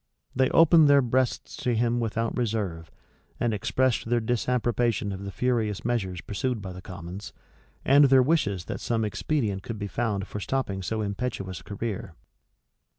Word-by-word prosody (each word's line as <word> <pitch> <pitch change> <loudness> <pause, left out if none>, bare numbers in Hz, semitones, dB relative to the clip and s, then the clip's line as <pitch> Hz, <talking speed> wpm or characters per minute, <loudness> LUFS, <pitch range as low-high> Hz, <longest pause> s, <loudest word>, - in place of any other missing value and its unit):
They 130 0 +3
opened 165 -1 +6
their 140 -1 +6
breasts 125 +1 0
to 125 -2 0
him 120 +1 +1
without 115 0 -1
reserve, 100 -9 -2 0.5
and 120 -2 +1
expressed 120 +3 0
their 120 0 +3
disapprobation 120 -2 0
of 95 +1 -6
the 100 - -5
furious 110 -2 -1
measures 95 -7 -1
pursued 125 +3 -2
by 95 -2 -6
the 90 - -9
commons, 95 +2 -8 0.5
and 140 +2 +7
their 135 -1 +6
wishes 105 - +1
that - - -5
some 115 -2 0
expedient 105 -3 -1
could 115 +3 -6
be 100 - -4
found 100 -1 -2
for 105 - -5
stopping 100 -4 -2
so 110 +4 -2
impetuous 100 -4 -3
a - - -16
career. 100 -4 -5
115 Hz, 160 wpm, -26 LUFS, 100-125 Hz, 0.5 s, and